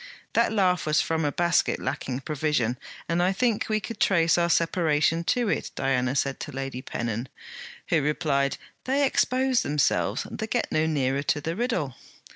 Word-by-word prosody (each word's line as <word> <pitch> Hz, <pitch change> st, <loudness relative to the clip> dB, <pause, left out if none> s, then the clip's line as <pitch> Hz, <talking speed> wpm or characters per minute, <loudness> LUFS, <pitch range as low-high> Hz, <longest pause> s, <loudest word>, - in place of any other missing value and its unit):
'That 230 Hz, -1 st, +3 dB
laugh 185 Hz, -6 st, +2 dB
was 155 Hz, 0 st, +3 dB
from 160 Hz, 0 st, 0 dB
a 145 Hz, -, +1 dB
basket 175 Hz, +3 st, +1 dB
lacking 130 Hz, -1 st, -3 dB
provision; 150 Hz, -6 st, 0 dB, 0.3 s
and 170 Hz, +1 st, +1 dB
I 180 Hz, +2 st, +3 dB
think 225 Hz, +2 st, 0 dB
we 215 Hz, 0 st, +2 dB
could 215 Hz, +1 st, -7 dB
trace 170 Hz, -4 st, +3 dB
our 170 Hz, 0 st, +2 dB
separation 165 Hz, -1 st, +2 dB
to 245 Hz, +3 st, +1 dB
it,' -, -, -1 dB
Diana 130 Hz, -1 st, 0 dB
said 135 Hz, 0 st, 0 dB
to -, -, -6 dB
Lady 135 Hz, -1 st, -5 dB
Pennon, 120 Hz, 0 st, -4 dB, 0.6 s
who 160 Hz, -, +3 dB
replied: 140 Hz, -2 st, 0 dB, 0.3 s
'They 275 Hz, +2 st, +2 dB
expose 260 Hz, -1 st, +2 dB
themselves; 145 Hz, -1 st, 0 dB
they -, -, -4 dB
get -, -, -1 dB
no 155 Hz, +1 st, +2 dB
nearer 140 Hz, -3 st, 0 dB
to 145 Hz, +1 st, 0 dB
the 165 Hz, +3 st, -3 dB
riddle.' 215 Hz, -, -1 dB
160 Hz, 170 wpm, -26 LUFS, 140-190 Hz, 0.6 s, That